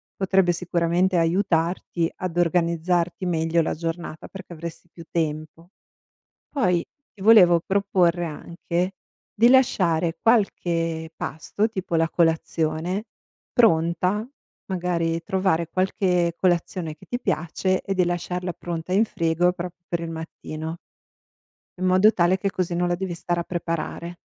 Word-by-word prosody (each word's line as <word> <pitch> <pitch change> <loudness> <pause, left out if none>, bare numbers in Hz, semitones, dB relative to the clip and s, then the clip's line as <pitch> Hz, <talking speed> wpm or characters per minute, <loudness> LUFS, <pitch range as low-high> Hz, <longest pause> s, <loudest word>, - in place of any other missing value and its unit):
potrebbe 190 -2 +2
sicuramente 175 +1 +1
aiutarti 170 -1 +1
ad 180 -2 -5
organizzarti 175 +1 +1
meglio 165 -1 +1
la 160 - -1
giornata, 165 -1 -5
perché 190 -2 -10
avresti 170 +1 -8
più 170 - -11
tempo. 160 +1 -3 0.8
Poi, 180 - +1 0.3
ti 205 - -18
volevo 185 -6 +7
proporre 185 -3 +2
anche 170 +3 -3 0.5
di 235 +3 +7
lasciare 175 -11 +3
qualche 165 -7 +1
pasto, 160 +10 -2
tipo 190 -5 -5
la 165 0 +3
colazione, 165 +3 0 0.5
pronta, 180 +1 +2 0.4
magari 170 -3 -1
trovare 185 -2 0
qualche 180 -1 +1
colazione 175 -3 0
che - - -17
ti 245 - -3
piace 185 +2 0
e 195 - -2
di 180 -1 +3
lasciarla 180 +1 -2
pronta 170 0 -5
in 205 +4 +4
frigo 170 -2 +1
proprio 180 0 -6
per 170 - -2
il 165 -1 -5
mattino 160 0 -6 1.0
in 185 - -1
modo 185 +4 +5
tale 180 -1 +2
che 195 +1 -1
così 180 -2 -2
non 175 0 +1
la 175 - +1
devi 185 0 -4
stare 175 0 -2
a - - -1
preparare 170 0 -4
175 Hz, 130 wpm, -24 LUFS, 165-185 Hz, 1.0 s, volevo